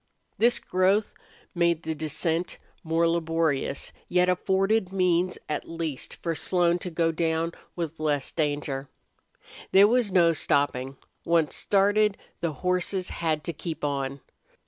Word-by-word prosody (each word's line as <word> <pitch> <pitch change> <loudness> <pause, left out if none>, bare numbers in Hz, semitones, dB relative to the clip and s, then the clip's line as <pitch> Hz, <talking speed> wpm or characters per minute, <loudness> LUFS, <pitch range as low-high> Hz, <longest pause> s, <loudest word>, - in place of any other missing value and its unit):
This 240 +1 +5
growth 190 +3 +1 0.4
made 170 -2 +1
the 160 - -2
descent 160 +3 -2 0.3
more 165 0 +2
laborious, 165 -4 0 0.2
yet 180 0 +3
afforded 190 +2 +1
means 180 -1 +1
at 150 - -4
least 165 -4 -4
for 165 - 0
Slone 175 +2 +1
to 180 - -4
go 165 -1 +1
down 165 0 -1 0.2
with 165 -2 -4
less 145 -3 0
danger. 145 -3 -2 0.8
There 195 +2 +7
was 235 -2 +2
no 170 -3 +5
stopping. 135 -3 0 0.3
Once 165 -2 +2
started, 205 +1 +2 0.2
the 170 - -1
horses 180 +1 0
had 160 -2 -1
to 170 - -4
keep 160 +1 -6
on. 140 -1 -2
170 Hz, 130 wpm, -26 LUFS, 155-180 Hz, 0.8 s, There